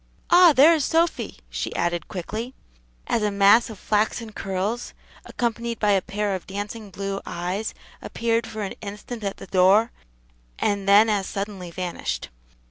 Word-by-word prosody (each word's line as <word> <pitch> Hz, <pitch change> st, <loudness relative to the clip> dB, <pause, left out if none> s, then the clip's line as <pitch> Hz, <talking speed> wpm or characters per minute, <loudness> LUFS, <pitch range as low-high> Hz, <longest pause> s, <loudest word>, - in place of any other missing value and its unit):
"Ah, 350 Hz, -1 st, +8 dB
there 295 Hz, +4 st, +7 dB
is 310 Hz, -3 st, +1 dB
Sophy!" 330 Hz, +3 st, 0 dB
she -, -, -4 dB
added 175 Hz, -1 st, -1 dB
quickly, 215 Hz, +7 st, -5 dB, 0.5 s
as 230 Hz, -, 0 dB
a 210 Hz, -, +1 dB
mass 200 Hz, +4 st, +5 dB
of 220 Hz, -, -8 dB
flaxen 215 Hz, +3 st, -1 dB
curls, 195 Hz, +4 st, -3 dB, 0.3 s
accompanied 235 Hz, 0 st, -2 dB
by 210 Hz, -1 st, +2 dB
a 195 Hz, -2 st, +3 dB
pair 205 Hz, +1 st, -2 dB
of 185 Hz, -, -5 dB
dancing 205 Hz, +2 st, -6 dB
blue 195 Hz, 0 st, -4 dB
eyes, 180 Hz, +5 st, -4 dB, 0.3 s
appeared 230 Hz, 0 st, -1 dB
for 220 Hz, -2 st, -5 dB
an 195 Hz, -, -4 dB
instant 210 Hz, +2 st, -7 dB
at 200 Hz, -1 st, -3 dB
the -, -, -9 dB
door, 195 Hz, +5 st, +4 dB, 0.7 s
and 200 Hz, -1 st, 0 dB
then 205 Hz, +3 st, +7 dB
as 205 Hz, -3 st, 0 dB
suddenly 195 Hz, -3 st, -5 dB
vanished. 180 Hz, +1 st, -4 dB
205 Hz, 155 wpm, -24 LUFS, 195-230 Hz, 0.7 s, Ah